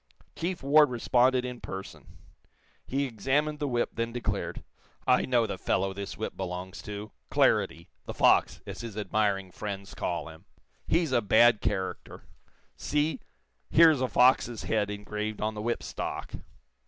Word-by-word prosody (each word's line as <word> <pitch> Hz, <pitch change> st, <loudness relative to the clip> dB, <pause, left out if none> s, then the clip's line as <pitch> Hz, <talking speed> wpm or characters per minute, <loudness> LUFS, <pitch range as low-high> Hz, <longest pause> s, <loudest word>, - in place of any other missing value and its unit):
Chief 175 Hz, -2 st, -3 dB
Ward 150 Hz, +1 st, +6 dB
responded 125 Hz, +1 st, +2 dB
in 125 Hz, -1 st, -6 dB
person. 95 Hz, +1 st, -9 dB, 0.7 s
He 140 Hz, +2 st, 0 dB
examined 140 Hz, +6 st, 0 dB
the 145 Hz, -, -1 dB
whip, 120 Hz, -2 st, 0 dB
then 115 Hz, 0 st, -2 dB
declared: 120 Hz, 0 st, -3 dB, 0.4 s
"I 125 Hz, -, +4 dB
know 120 Hz, -3 st, +3 dB
the 100 Hz, -3 st, -5 dB
fellow 95 Hz, +1 st, 0 dB
this 100 Hz, 0 st, -6 dB
whip -, -, -4 dB
belongs 90 Hz, 0 st, -5 dB
to 105 Hz, +1 st, -7 dB, 0.2 s
Claridy, 85 Hz, +1 st, +2 dB, 0.2 s
'the -, -, -4 dB
fox,' -, -, +3 dB
as -, -, -7 dB
his 115 Hz, -3 st, -7 dB
admiring 100 Hz, -3 st, 0 dB
friends 100 Hz, 0 st, -6 dB
call 85 Hz, -1 st, -3 dB
him. 80 Hz, 0 st, -14 dB, 0.4 s
He's 165 Hz, -4 st, +1 dB
a 120 Hz, -, +3 dB
bad 110 Hz, +1 st, +5 dB
character. 95 Hz, -2 st, -3 dB, 0.5 s
See; 150 Hz, +2 st, -1 dB, 0.5 s
here 165 Hz, 0 st, +7 dB
is 145 Hz, -4 st, -1 dB
a 130 Hz, -, +2 dB
fox's 125 Hz, -2 st, +3 dB
head 105 Hz, -2 st, 0 dB
engraved 105 Hz, +1 st, -4 dB
on 110 Hz, +1 st, -1 dB
the 105 Hz, -, -6 dB
whip 120 Hz, +2 st, -2 dB
stock. -, -, -5 dB
115 Hz, 155 wpm, -28 LUFS, 100-130 Hz, 0.7 s, here